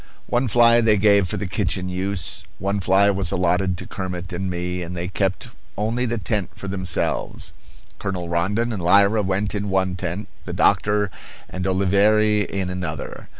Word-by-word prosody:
One 125 Hz, +2 st, 0 dB
fly 120 Hz, +1 st, +5 dB
they 110 Hz, -2 st, +4 dB
gave 100 Hz, -1 st, +4 dB
for -, -, -3 dB
the 105 Hz, -, -3 dB
kitchen 95 Hz, -1 st, -1 dB
use, 95 Hz, +1 st, -2 dB
one 100 Hz, +1 st, -1 dB
fly 95 Hz, +2 st, +4 dB
was 100 Hz, 0 st, -1 dB
allotted 90 Hz, 0 st, +1 dB
to -, -, -7 dB
Kermit 90 Hz, -2 st, -5 dB
and 95 Hz, +2 st, -3 dB
me, 90 Hz, 0 st, -3 dB
and 90 Hz, +1 st, -6 dB
they 85 Hz, +1 st, -3 dB
kept 95 Hz, 0 st, -2 dB, 0.3 s
only 115 Hz, +4 st, 0 dB
the 120 Hz, +1 st, -1 dB
tent 105 Hz, -3 st, -2 dB
for 100 Hz, -, -8 dB
themselves. 95 Hz, -2 st, -2 dB, 0.5 s
Colonel 95 Hz, -4 st, -3 dB
Rondon 100 Hz, +8 st, 0 dB
and 100 Hz, -, -4 dB
Lyra 100 Hz, +5 st, +4 dB
went 100 Hz, +1 st, -1 dB
in 100 Hz, -1 st, -2 dB
one 95 Hz, -1 st, +1 dB
tent, 90 Hz, +3 st, -4 dB, 0.2 s
the -, -, -5 dB
doctor 105 Hz, -1 st, +2 dB, 0.4 s
and 95 Hz, 0 st, -4 dB
Oliveira 105 Hz, +3 st, +3 dB
in 95 Hz, -2 st, -2 dB
another. 90 Hz, -1 st, -5 dB
95 Hz, 170 wpm, -22 LUFS, 90-105 Hz, 0.5 s, fly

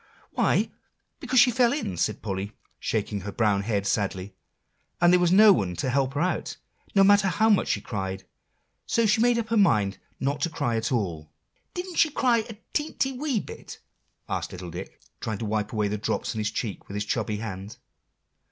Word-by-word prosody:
"Why, -, -, +1 dB, 0.5 s
because 260 Hz, -, +2 dB
she 245 Hz, +1 st, +6 dB
fell 240 Hz, 0 st, +3 dB
in," 280 Hz, -, -2 dB
said 105 Hz, +5 st, -1 dB
Polly, 100 Hz, 0 st, -3 dB, 0.3 s
shaking 105 Hz, -2 st, -2 dB
her 100 Hz, +3 st, -5 dB
brown 105 Hz, -3 st, +1 dB
head 100 Hz, -1 st, -1 dB
sadly, 100 Hz, -1 st, -1 dB, 0.7 s
"and 175 Hz, 0 st, +5 dB
there 180 Hz, -, +6 dB
was 175 Hz, -1 st, +3 dB
no 210 Hz, +2 st, +8 dB
one 90 Hz, -, -1 dB
to 130 Hz, -, -1 dB
help 135 Hz, +1 st, 0 dB
her 145 Hz, -, 0 dB
out, 185 Hz, -, -1 dB, 0.4 s
no 195 Hz, -, +7 dB
matter 200 Hz, 0 st, +5 dB
how 220 Hz, +4 st, +3 dB
much 205 Hz, -, +3 dB
she -, -, 0 dB
cried; 95 Hz, -3 st, -4 dB, 0.6 s
so 230 Hz, -, +2 dB
she 220 Hz, +1 st, +3 dB
made 240 Hz, 0 st, +4 dB
up 225 Hz, -2 st, -2 dB
her 230 Hz, -, +2 dB
mind 105 Hz, -, +3 dB, 0.2 s
not 140 Hz, +2 st, -1 dB
to 170 Hz, -, +1 dB
cry 120 Hz, -7 st, -1 dB
at 110 Hz, 0 st, -1 dB
all." 85 Hz, -10 st, -2 dB, 0.5 s
"Didn't 360 Hz, -1 st, -5 dB
she 315 Hz, -, +5 dB
cry 250 Hz, -5 st, +2 dB
a 225 Hz, -, -7 dB, 0.2 s
teenty, 295 Hz, -3 st, -1 dB
wee 270 Hz, -3 st, -1 dB
bit?" -, -, -9 dB, 0.5 s
asked -, -, -3 dB
little 90 Hz, -1 st, -7 dB
Dick, 90 Hz, +3 st, -8 dB, 0.2 s
trying 110 Hz, -2 st, -3 dB
to 110 Hz, -, -4 dB
wipe 105 Hz, 0 st, -1 dB
away 105 Hz, -2 st, 0 dB
the 105 Hz, +1 st, -3 dB
drops 110 Hz, -, -2 dB
on 110 Hz, -, -4 dB
his 105 Hz, 0 st, 0 dB
cheeks 105 Hz, -2 st, -5 dB
with 100 Hz, -, -8 dB
his 105 Hz, 0 st, -2 dB
chubby 105 Hz, +1 st, -1 dB
hand. 105 Hz, -1 st, -6 dB
115 Hz, 200 wpm, -26 LUFS, -, 0.7 s, no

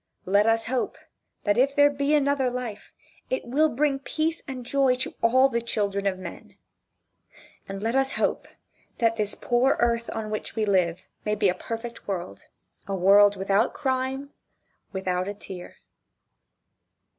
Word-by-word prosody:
Let 200 Hz, +3 st, +3 dB
us 225 Hz, 0 st, +2 dB
hope 250 Hz, +1 st, -2 dB, 0.5 s
that 205 Hz, +3 st, +2 dB
if 275 Hz, +2 st, +3 dB
there 290 Hz, 0 st, +6 dB
be 285 Hz, +1 st, +1 dB
another 280 Hz, -2 st, +2 dB
life 245 Hz, -4 st, -6 dB, 0.4 s
it -, -, -2 dB
will 295 Hz, +6 st, +3 dB
bring 280 Hz, +1 st, +1 dB
peace 315 Hz, +3 st, -2 dB
and 255 Hz, -3 st, -6 dB
joy 270 Hz, 0 st, +3 dB
to 255 Hz, -, -3 dB
all 260 Hz, +3 st, +5 dB
the 235 Hz, -3 st, -1 dB
children 200 Hz, -3 st, -1 dB
of 190 Hz, -1 st, 0 dB
men. 185 Hz, -2 st, -10 dB, 1.1 s
And 195 Hz, +1 st, -5 dB
let 225 Hz, +1 st, 0 dB
us 270 Hz, 0 st, +1 dB
hope -, -, 0 dB, 0.5 s
that 230 Hz, -1 st, +2 dB
this 210 Hz, -1 st, -1 dB
poor 245 Hz, +2 st, +2 dB
earth 235 Hz, -1 st, +1 dB
on 215 Hz, -1 st, -4 dB
which 215 Hz, -, -4 dB
we 220 Hz, -1 st, +1 dB
live, 180 Hz, -4 st, +1 dB, 0.2 s
may 210 Hz, 0 st, 0 dB
be 205 Hz, -2 st, +3 dB
a -, -, +2 dB
perfect 230 Hz, +4 st, -7 dB
world 185 Hz, -3 st, -5 dB, 0.4 s
a 195 Hz, -, -2 dB
world 200 Hz, +2 st, +6 dB
without 195 Hz, +1 st, +2 dB
a -, -, -14 dB
crime 265 Hz, +1 st, -2 dB, 0.6 s
without 185 Hz, -1 st, -2 dB
a 205 Hz, -, -4 dB
tear. 185 Hz, -3 st, -9 dB
230 Hz, 160 wpm, -26 LUFS, 200-265 Hz, 1.1 s, there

